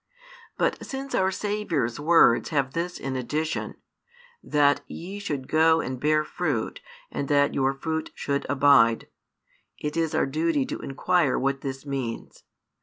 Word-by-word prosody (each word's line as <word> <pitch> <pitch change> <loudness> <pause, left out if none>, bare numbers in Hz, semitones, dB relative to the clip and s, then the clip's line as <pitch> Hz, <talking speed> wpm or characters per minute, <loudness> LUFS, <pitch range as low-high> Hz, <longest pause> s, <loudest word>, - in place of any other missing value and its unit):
But - - 0
since 270 0 -6
our 190 0 +2
Saviour's 190 - -2
words 155 -6 +4
have 140 -4 0
this 175 +1 -3
addition, 135 +4 -3 0.7
that 145 -1 +3
ye 195 +4 -7
should 145 -10 -4
go 160 +1 +4
and 130 -4 -4
bear 155 +2 +2
fruit 150 -7 -3 0.3
and 140 - -3
that 145 0 +3
your 135 0 +2
fruit 160 +3 -3
should 140 0 -2
abide, 130 -5 +4 0.7
it 150 0 -4
is 165 -2 0
our - - +3
duty 150 0 0
to - - -5
inquire 155 +1 +1
what 135 +1 -1
this 135 0 -5
means. 135 -5 -5
145 Hz, 140 wpm, -26 LUFS, 135-165 Hz, 0.7 s, words